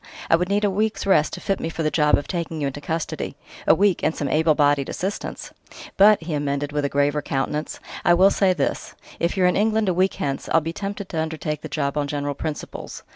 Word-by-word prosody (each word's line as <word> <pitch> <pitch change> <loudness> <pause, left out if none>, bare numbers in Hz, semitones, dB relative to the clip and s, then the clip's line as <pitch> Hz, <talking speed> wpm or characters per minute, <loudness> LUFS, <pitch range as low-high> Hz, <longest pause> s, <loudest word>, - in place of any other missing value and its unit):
I - - +8
would 180 +2 -1
need 205 +1 +1
a 205 - +3
week's 215 +2 -1
rest 175 -6 +3
to - - -5
fit 195 - -1
me 165 - -3
for 165 0 -4
the 155 - +1
job 150 -2 +4
of 145 - -5
taking 170 -3 -3
you 145 - -1
into 140 +1 -4
custody 160 +2 -3 0.3
a - - +7
week 200 -2 +2
and 160 - 0
some 145 - -2
able 155 +1 +3
bodied 145 -2 +2
assistance!... 195 +3 -4 0.4
But," 205 -2 +6
he 160 -1 -4
amended 145 0 -1
with 145 -1 -1
graver 145 +1 +1
countenance, 145 +2 -3 0.2
"I 175 - +5
will 190 +3 +5
say 195 -2 +3
this: - - -2 0.2
if 170 +4 0
you're 185 - +3
in 180 - +3
England 215 0 +2
a - - +2
week 185 +2 +1
hence, 135 -1 -3
I'll 165 - +5
be 165 +1 -5
tempted 200 +1 -5
to 160 - -1
undertake 155 -1 -3
the 155 - -7
job 140 -1 -2
on 145 - -1
general 145 0 -2
principles. 150 +2 -6
160 Hz, 235 wpm, -23 LUFS, 145-190 Hz, 0.4 s, I